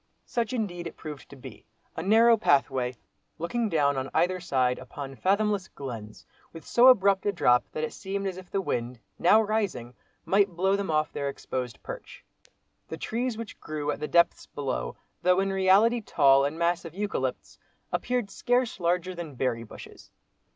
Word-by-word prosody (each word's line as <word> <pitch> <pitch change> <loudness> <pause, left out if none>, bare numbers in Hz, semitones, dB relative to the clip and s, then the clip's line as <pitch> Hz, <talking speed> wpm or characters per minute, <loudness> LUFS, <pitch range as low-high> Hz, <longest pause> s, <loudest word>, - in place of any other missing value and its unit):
Such 230 -3 -2
indeed 185 -8 -3
it - - -10
proved 150 -3 -9
to - - -11
be. 130 - -11 0.3
A - - -3
narrow 225 +5 +5
pathway, 135 - +1 0.4
looking 225 +7 -1
down 145 -5 +2
on 130 0 -3
either 180 +3 +2
side, 130 -7 0
upon 135 +2 -8
fathomless 200 +3 +1
glens, 115 -6 -8 0.3
with 165 - -10
so 245 +2 +5
abrupt 200 -5 +5
a - - +3
drop 125 -10 +3
that 155 - -4
it 155 - -3
seemed 195 +1 -4
as 190 -2 -2
if 185 -1 -11
the 195 - -1
wind, 120 -7 -3 0.2
now 205 +6 +6
rising, 205 - -1 0.3
might 195 -2 +2
blow 190 +3 +2
them 200 -2 -3
off 155 0 +1
their 140 -1 -2
exposed 125 -3 -5
perch. - - -9 0.6
The 160 - -6
trees 235 +5 -2
which 230 -2 -8
grew 150 -1 -3
at - - -5
the 150 - -3
depths 170 +1 +3
below, 130 - -4 0.3
though 180 +1 +3
in 195 0 0
reality 195 +5 +4
tall 140 -8 +4
and 145 +3 -3
massive 170 -1 -1
eucalypts, 205 +1 -3 0.3
appeared 245 -5 -1
scarce 245 +1 0
larger 180 +1 0
than 170 -5 -7
berry 120 -2 -1
bushes. 115 - -12
175 Hz, 170 wpm, -27 LUFS, 140-200 Hz, 0.6 s, now